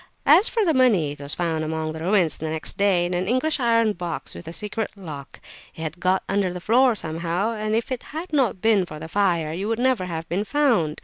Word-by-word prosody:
As 405 Hz, -, +6 dB
for 450 Hz, -3 st, +1 dB
the 325 Hz, -, +3 dB
money, 220 Hz, -, +3 dB
it 145 Hz, -, -9 dB
was 140 Hz, 0 st, -2 dB
found 165 Hz, -2 st, -1 dB
among 155 Hz, 0 st, -2 dB
the 160 Hz, -, -7 dB
ruins 175 Hz, -2 st, +1 dB
next 160 Hz, 0 st, -3 dB
day 195 Hz, -3 st, +2 dB
in 175 Hz, -, -3 dB
an 180 Hz, +1 st, -1 dB
English 255 Hz, +7 st, +1 dB
iron 230 Hz, -3 st, +3 dB
box 175 Hz, -3 st, -5 dB
with 170 Hz, -, -10 dB
a -, -, -5 dB
secret 210 Hz, +4 st, -3 dB
lock; 155 Hz, -8 st, -9 dB, 0.4 s
it -, -, -9 dB
had 160 Hz, +2 st, -5 dB
got 185 Hz, +2 st, +1 dB
under 195 Hz, -2 st, 0 dB
the 180 Hz, -, -6 dB
floor 240 Hz, +5 st, +3 dB
somehow, 170 Hz, +4 st, -2 dB
and 215 Hz, -1 st, -2 dB
if 230 Hz, +4 st, -2 dB
it 255 Hz, -, -2 dB
had 320 Hz, +3 st, -6 dB
not 245 Hz, -10 st, +1 dB
been 220 Hz, -4 st, +4 dB
for 155 Hz, -3 st, -8 dB
the 160 Hz, +1 st, -7 dB
fire 170 Hz, -4 st, +1 dB
it 185 Hz, +4 st, -3 dB
would 225 Hz, +1 st, -1 dB
never 250 Hz, -5 st, +1 dB
have 165 Hz, -2 st, -5 dB
been 185 Hz, +5 st, -1 dB
found! 225 Hz, -, +1 dB
190 Hz, 235 wpm, -23 LUFS, 165-230 Hz, 0.4 s, As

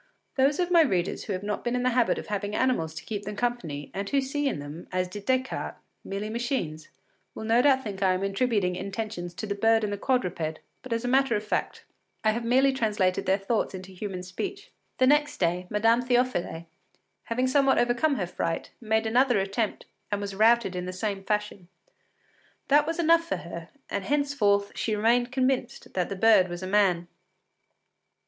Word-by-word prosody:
Those 280 Hz, +3 st, +3 dB
of 360 Hz, 0 st, 0 dB
my 340 Hz, -2 st, +7 dB
readers 185 Hz, -, 0 dB
who 205 Hz, -, -2 dB
have 185 Hz, +1 st, -4 dB
not 210 Hz, 0 st, -3 dB
been 240 Hz, 0 st, -1 dB
in 250 Hz, -, 0 dB
the 255 Hz, -, +2 dB
habit 245 Hz, -1 st, +2 dB
of -, -, -5 dB
having 205 Hz, 0 st, -3 dB
animals 205 Hz, -12 st, 0 dB
to -, -, -8 dB
keep 205 Hz, -2 st, -4 dB
them 210 Hz, +1 st, -5 dB
company, 190 Hz, -12 st, -3 dB
and 200 Hz, +1 st, -3 dB
who 280 Hz, -, +2 dB
see 275 Hz, +2 st, -1 dB
in 270 Hz, -, -1 dB
them, 145 Hz, +4 st, -8 dB
as 185 Hz, 0 st, 0 dB
did 200 Hz, +2 st, -9 dB
Descartes, 260 Hz, 0 st, -1 dB, 0.3 s
merely 200 Hz, +2 st, -4 dB
machines, 220 Hz, -, -3 dB, 0.5 s
will -, -, -6 dB
no 225 Hz, +2 st, +4 dB
doubt 265 Hz, -1 st, +4 dB
think 200 Hz, -3 st, -6 dB
I 190 Hz, -1 st, +4 dB
am 185 Hz, +1 st, -2 dB
attributing 195 Hz, -2 st, +1 dB
intentions 195 Hz, -3 st, -5 dB
to 215 Hz, -, -5 dB
the 205 Hz, -, -2 dB
bird 225 Hz, +2 st, +3 dB
and 205 Hz, -1 st, -1 dB
the 200 Hz, -, -4 dB
quadruped, 180 Hz, -12 st, -1 dB, 0.2 s
but 255 Hz, -, -11 dB
as 230 Hz, +1 st, -1 dB
a -, -, 0 dB
matter 265 Hz, -1 st, +3 dB
of 210 Hz, -, -1 dB
fact, 210 Hz, -, -3 dB, 0.4 s
I 215 Hz, -, +4 dB
have 235 Hz, +2 st, -3 dB
merely 260 Hz, +3 st, +3 dB
translated 210 Hz, -7 st, 0 dB
their 190 Hz, +1 st, +4 dB
thoughts 200 Hz, 0 st, -1 dB
into 185 Hz, 0 st, -9 dB
human 185 Hz, -1 st, -5 dB
speech. 385 Hz, -, -6 dB, 0.3 s
The 255 Hz, -, +4 dB
next 295 Hz, +2 st, +3 dB
day, 180 Hz, +1 st, 0 dB
Madame 225 Hz, +3 st, +3 dB
Théophile, 245 Hz, -9 st, 0 dB, 0.6 s
having 245 Hz, +2 st, 0 dB
somewhat 270 Hz, +1 st, +3 dB
overcome 240 Hz, +5 st, +2 dB
her 195 Hz, -, -1 dB
fright, 165 Hz, -1 st, -3 dB
made 220 Hz, 0 st, +1 dB
another 245 Hz, +1 st, +3 dB
attempt, 200 Hz, +3 st, -2 dB, 0.3 s
and 205 Hz, -, 0 dB
was 200 Hz, -1 st, -4 dB
routed 220 Hz, -1 st, +3 dB
in 180 Hz, 0 st, -3 dB
the 185 Hz, -, -4 dB
same 195 Hz, +1 st, -3 dB
fashion. 210 Hz, -3 st, -2 dB, 1.0 s
That 295 Hz, +1 st, +5 dB
was 330 Hz, -, -2 dB
enough 335 Hz, 0 st, +4 dB
for -, -, -2 dB
her, 170 Hz, -1 st, -8 dB, 0.2 s
and 200 Hz, -, -3 dB
henceforth 230 Hz, -8 st, +1 dB
she 220 Hz, -, -1 dB
remained 240 Hz, +3 st, +2 dB
convinced 260 Hz, -1 st, -1 dB
that 180 Hz, -2 st, -1 dB
the 200 Hz, -, -3 dB
bird 205 Hz, -2 st, +5 dB
was 175 Hz, +1 st, -6 dB
a -, -, -2 dB
man. 185 Hz, -4 st, +2 dB
215 Hz, 195 wpm, -27 LUFS, 190-255 Hz, 1.0 s, my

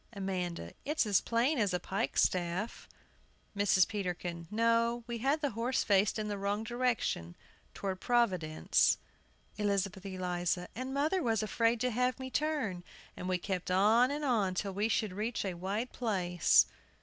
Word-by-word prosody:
AMANDA. 180 Hz, -, -4 dB
It's 300 Hz, -1 st, +1 dB
as 205 Hz, -3 st, +3 dB
plain 245 Hz, +5 st, +1 dB
as 200 Hz, -4 st, +1 dB
a -, -, 0 dB
pikestaff! 185 Hz, 0 st, -1 dB, 0.7 s
MRS. 200 Hz, -2 st, +4 dB
PETERKIN. 175 Hz, -4 st, -4 dB
No; 230 Hz, +2 st, +2 dB
we 235 Hz, -1 st, -4 dB
had 275 Hz, +6 st, +1 dB
the 285 Hz, -3 st, 0 dB
horse 235 Hz, +4 st, 0 dB
faced 200 Hz, +1 st, +3 dB
in 215 Hz, -1 st, -2 dB
the 205 Hz, -1 st, -3 dB
wrong 200 Hz, +2 st, -1 dB
direction, 240 Hz, -, -1 dB, 0.4 s
toward 190 Hz, -2 st, -4 dB
Providence. 185 Hz, -11 st, +2 dB, 0.6 s
ELIZABETH 195 Hz, -2 st, 0 dB
ELIZA. 180 Hz, -2 st, -2 dB
And 255 Hz, +4 st, -5 dB
mother 305 Hz, +7 st, +1 dB
was 225 Hz, -6 st, +1 dB
afraid 230 Hz, +2 st, +1 dB
to 250 Hz, 0 st, +1 dB
have 250 Hz, +2 st, 0 dB
me 260 Hz, 0 st, -6 dB
turn, 275 Hz, -, -1 dB, 0.3 s
and 180 Hz, -, -5 dB
we 185 Hz, -, +2 dB
kept 185 Hz, -1 st, -3 dB
on 215 Hz, +7 st, +4 dB
and 295 Hz, +1 st, -2 dB
on 210 Hz, -8 st, +1 dB
till 195 Hz, +1 st, -2 dB
we 205 Hz, +3 st, 0 dB
should 215 Hz, -4 st, 0 dB
reach 215 Hz, +3 st, -2 dB
a 190 Hz, -, -2 dB
wide 195 Hz, +8 st, -3 dB
place. 180 Hz, -7 st, +3 dB
210 Hz, 155 wpm, -32 LUFS, 185-240 Hz, 0.7 s, MRS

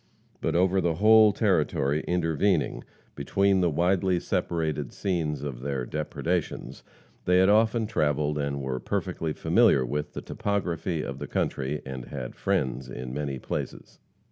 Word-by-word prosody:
But -, -, -1 dB
over 95 Hz, +2 st, +3 dB
the 85 Hz, -2 st, +1 dB
whole 110 Hz, +3 st, +6 dB
territory 80 Hz, -, +1 dB
intervening 85 Hz, 0 st, +1 dB, 0.3 s
between 95 Hz, +7 st, +2 dB
the 90 Hz, -, +3 dB
widely 90 Hz, +3 st, +2 dB
separated 80 Hz, -3 st, -2 dB
scenes 80 Hz, -7 st, -2 dB
of 70 Hz, -5 st, -5 dB
their 70 Hz, -2 st, -2 dB
depredations, 80 Hz, +4 st, -3 dB, 0.4 s
they 90 Hz, 0 st, +4 dB
had 95 Hz, +1 st, +5 dB
often 110 Hz, +2 st, +3 dB
travelled 75 Hz, -7 st, 0 dB
and 70 Hz, -1 st, -2 dB
were 65 Hz, -1 st, -2 dB
perfectly 80 Hz, +4 st, -2 dB
familiar 65 Hz, -3 st, +3 dB
with 75 Hz, +4 st, -3 dB
the -, -, -5 dB
topography 85 Hz, -5 st, -2 dB
of -, -, -6 dB
the -, -, -5 dB
country, 70 Hz, +2 st, -2 dB
and 65 Hz, -2 st, -6 dB
had 65 Hz, -2 st, -6 dB
friends 65 Hz, 0 st, -1 dB
in 60 Hz, 0 st, -6 dB
many 70 Hz, -1 st, -3 dB
places. -, -, -6 dB
80 Hz, 145 wpm, -27 LUFS, 70-95 Hz, 0.4 s, whole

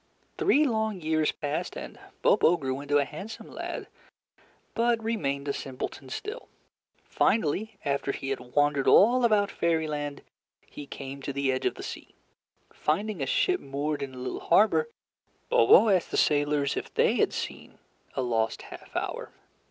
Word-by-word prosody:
Three 380 Hz, -7 st, +4 dB
long 220 Hz, -5 st, 0 dB
years 155 Hz, -1 st, +1 dB
passed, 145 Hz, -1 st, -4 dB
and -, -, -8 dB, 0.2 s
Bobo 175 Hz, -, +5 dB
grew 135 Hz, -3 st, -3 dB
into 145 Hz, 0 st, +1 dB
a 140 Hz, -, +2 dB
handsome 220 Hz, +8 st, -9 dB
lad, -, -, -5 dB, 0.9 s
but 235 Hz, 0 st, +2 dB
remained 145 Hz, -11 st, -2 dB
a 140 Hz, -, 0 dB
simpleton 130 Hz, 0 st, -6 dB
still. 425 Hz, -, -6 dB, 0.6 s
Finally, 215 Hz, +2 st, 0 dB
after 140 Hz, 0 st, 0 dB
he 135 Hz, -, -5 dB
had 135 Hz, -, -1 dB
wandered 145 Hz, +2 st, +1 dB
all 245 Hz, +5 st, +6 dB
about 210 Hz, -3 st, +3 dB
Fairyland, 150 Hz, -4 st, -1 dB, 0.4 s
he 145 Hz, -, -10 dB
came 135 Hz, 0 st, -7 dB
to 140 Hz, -, -4 dB
the 140 Hz, -1 st, 0 dB
edge 130 Hz, -, 0 dB
of -, -, -2 dB
the -, -, -8 dB
sea. -, -, -8 dB, 0.6 s
Finding 190 Hz, +3 st, -1 dB
a 135 Hz, -, -1 dB
ship 370 Hz, -, +2 dB
moored 145 Hz, +2 st, -3 dB
in 135 Hz, -2 st, -5 dB
a -, -, -8 dB
little 125 Hz, -, -4 dB
harbor, 220 Hz, -, +3 dB, 0.6 s
Bobo 460 Hz, -, +6 dB
asked 185 Hz, -4 st, +2 dB
the -, -, -2 dB
sailors 145 Hz, -1 st, +2 dB
if -, -, -5 dB
they -, -, +2 dB
had -, -, +3 dB
seen -, -, -6 dB, 0.4 s
a 130 Hz, -, 0 dB
lost 115 Hz, -2 st, -1 dB
half -, -, -12 dB
hour. -, -, -3 dB
150 Hz, 160 wpm, -28 LUFS, 140-215 Hz, 0.9 s, all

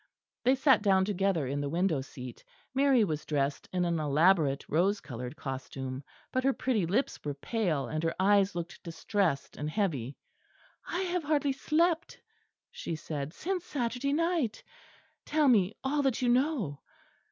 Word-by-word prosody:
They 260 Hz, +2 st, +4 dB
sat 265 Hz, -4 st, +4 dB
down 190 Hz, -2 st, +4 dB
together 195 Hz, -6 st, +1 dB
in 140 Hz, +2 st, -2 dB
the 145 Hz, -, -2 dB
window 170 Hz, -2 st, +1 dB
seat. 125 Hz, -2 st, -9 dB, 0.3 s
Mary 270 Hz, -3 st, +4 dB
was 155 Hz, -6 st, -2 dB
dressed 140 Hz, -1 st, -1 dB
in 180 Hz, -1 st, +1 dB
an 170 Hz, -2 st, 0 dB
elaborate 150 Hz, -1 st, +3 dB
rose 195 Hz, +6 st, +2 dB
coloured 125 Hz, 0 st, -7 dB
costume; 130 Hz, -1 st, -5 dB, 0.3 s
but 255 Hz, -, 0 dB
her 270 Hz, 0 st, +3 dB
pretty 225 Hz, -11 st, 0 dB
lips 225 Hz, +11 st, -1 dB
were 145 Hz, -1 st, -3 dB
pale, 165 Hz, -, -1 dB
and 155 Hz, +4 st, -2 dB
her 165 Hz, -, 0 dB
eyes 200 Hz, 0 st, +4 dB
looked 170 Hz, 0 st, -5 dB
distressed 170 Hz, -2 st, -1 dB
and 150 Hz, +1 st, -3 dB
heavy. 145 Hz, -, -1 dB, 0.7 s
"I 355 Hz, -, -2 dB
have 360 Hz, -2 st, -1 dB
hardly 290 Hz, -2 st, +1 dB
slept," 330 Hz, +4 st, +1 dB, 0.5 s
she 165 Hz, -, -4 dB
said, 150 Hz, -2 st, -5 dB
"since 365 Hz, -, -3 dB
Saturday 250 Hz, -1 st, -2 dB
night. 330 Hz, -7 st, 0 dB, 0.6 s
Tell 300 Hz, -1 st, +2 dB
me 215 Hz, -5 st, +4 dB
all 285 Hz, +2 st, +1 dB
that 270 Hz, -4 st, +1 dB
you 250 Hz, -, +1 dB
know." 245 Hz, -, +1 dB
190 Hz, 155 wpm, -30 LUFS, -, 0.7 s, They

